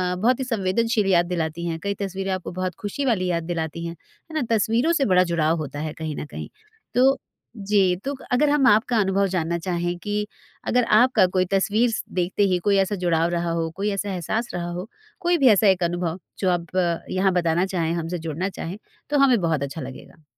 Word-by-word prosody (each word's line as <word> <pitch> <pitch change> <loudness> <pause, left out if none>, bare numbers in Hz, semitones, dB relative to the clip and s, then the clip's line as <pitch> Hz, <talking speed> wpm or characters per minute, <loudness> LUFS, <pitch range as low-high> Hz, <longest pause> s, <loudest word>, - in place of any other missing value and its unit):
बहुत 235 +8 +2
ही - - -1
संवेदनशील 225 0 0
याद 175 -1 +4
दिलाती 165 0 -3
हैं, 165 -1 -3
कई 200 0 0
तस्वीरें 195 0 -3
आपको 185 -1 -3
बहुत 185 -1 -3
खुशी 210 +7 -3
वाली 205 -8 +1
याद 170 -1 -1
दिलाती 165 0 -4
हैं। 170 0 -5
है 315 - -17
ना? - - -1
तस्वीरों 230 +8 +2
से - - +4
बड़ा 180 0 +6
जुड़ाव 160 0 +2
होता 145 -2 -5
है 155 0 -4
कहीं 155 -2 -5
न - - -5
कहीं। - - -8 0.5
तो 250 - +4 0.6
जी, 195 -3 +2
तो 280 - -1
क 265 - -14
अगर 285 +4 +3
हम 290 -2 +3
आपका 220 +3 +4
अनुभव 195 0 +2
जानना 170 -2 -1
चाहें 175 0 -2
कि 210 +2 -2 0.4
अगर 250 0 +3
आपका 250 -3 +5
कोई 185 0 +3
तस्वीर 215 +5 +2
स 225 - -2
देखते 180 +3 0
ही - - +3
कोई 200 -1 +4
ऐसा 195 +1 +1
जुड़ाव 170 -3 +1
रहा 170 -1 -1
हो, 165 -1 -1
कोई 200 +2 -1
ऐसा 200 +1 -2
एहसास 215 +7 -2
रहा 175 -1 -3
हो, 180 +3 -5 0.3
कोई 350 -2 +2
भी 275 -4 +4
ऐसा 210 -1 +5
एक 190 -2 +3
अनुभव 175 0 -1 0.2
जो 190 - +1
आप 175 0 -2 0.3
यहाँ 190 +1 +2
बताना 175 0 +2
चाहें 170 -4 -1
हमसे 170 +1 -3
जुड़ना 165 +4 -3
चाहें, 185 0 -6 0.3
तो 295 - +2
हमें 260 -4 +5
बहुत 160 -4 0
अच्छा 140 +3 -5
लगेगा। 135 +4 -10
185 Hz, 210 wpm, -23 LUFS, 170-210 Hz, 0.6 s, बड़ा